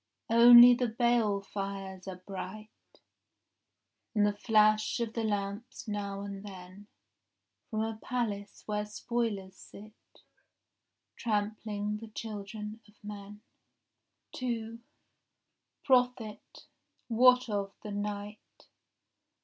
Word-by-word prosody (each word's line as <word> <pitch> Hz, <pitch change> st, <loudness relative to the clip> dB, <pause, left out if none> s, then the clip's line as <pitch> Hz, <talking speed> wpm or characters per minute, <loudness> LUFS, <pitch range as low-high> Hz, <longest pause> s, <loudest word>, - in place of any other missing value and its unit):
Only 240 Hz, +1 st, +10 dB
the 245 Hz, 0 st, 0 dB
balefires 200 Hz, -5 st, -1 dB
are 185 Hz, -1 st, -8 dB
bright, 200 Hz, +2 st, -7 dB, 1.4 s
And 205 Hz, -1 st, +4 dB
the 205 Hz, -, +2 dB
flash 215 Hz, +1 st, +3 dB
of 230 Hz, -1 st, -2 dB
the 230 Hz, -, -2 dB
lamps 205 Hz, +3 st, -3 dB
now 200 Hz, -1 st, -3 dB
and 200 Hz, -1 st, -7 dB
then 190 Hz, 0 st, -11 dB, 0.8 s
From 215 Hz, -2 st, -1 dB
a 220 Hz, 0 st, -3 dB
palace 210 Hz, -5 st, -3 dB
where 210 Hz, -1 st, -1 dB
spoilers 210 Hz, -3 st, -3 dB
sit, 215 Hz, +2 st, -15 dB, 0.9 s
Trampling 210 Hz, -1 st, -2 dB
the 225 Hz, +1 st, -9 dB
children 215 Hz, 0 st, -7 dB
of 210 Hz, -, -22 dB
men. 205 Hz, 0 st, -9 dB, 0.9 s
2 230 Hz, -2 st, -4 dB, 1.0 s
Prophet, 245 Hz, -5 st, 0 dB, 0.4 s
what 250 Hz, +2 st, +5 dB
of 200 Hz, -2 st, -3 dB
the 210 Hz, -, -6 dB
night? 205 Hz, +1 st, -4 dB
210 Hz, 95 wpm, -31 LUFS, 200-230 Hz, 1.4 s, Only